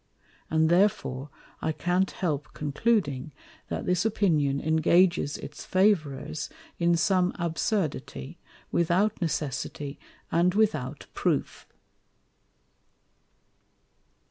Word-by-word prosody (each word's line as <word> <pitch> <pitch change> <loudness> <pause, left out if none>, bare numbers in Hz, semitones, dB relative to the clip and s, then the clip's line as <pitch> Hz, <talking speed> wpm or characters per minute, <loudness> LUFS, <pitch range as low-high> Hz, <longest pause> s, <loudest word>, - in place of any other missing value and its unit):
And 160 0 +3
therefore 170 -7 +2 0.3
I 160 - 0
can't 180 +4 +1
help 150 -6 -3
concluding, 150 - 0 0.3
that - - -4
this 180 0 +2
Opinion 160 -11 +2
engages 160 +1 +3
its 150 - -8
Favourers 160 -7 +1 0.3
in 170 0 +3
some 185 +1 +2
Absurdity, 165 - -2 0.3
without 185 +5 +2
Necessity 145 -2 -3 0.3
and 175 +2 +3
without 200 -12 0
Proof. - - -1
170 Hz, 85 wpm, -27 LUFS, 145-185 Hz, 0.3 s, And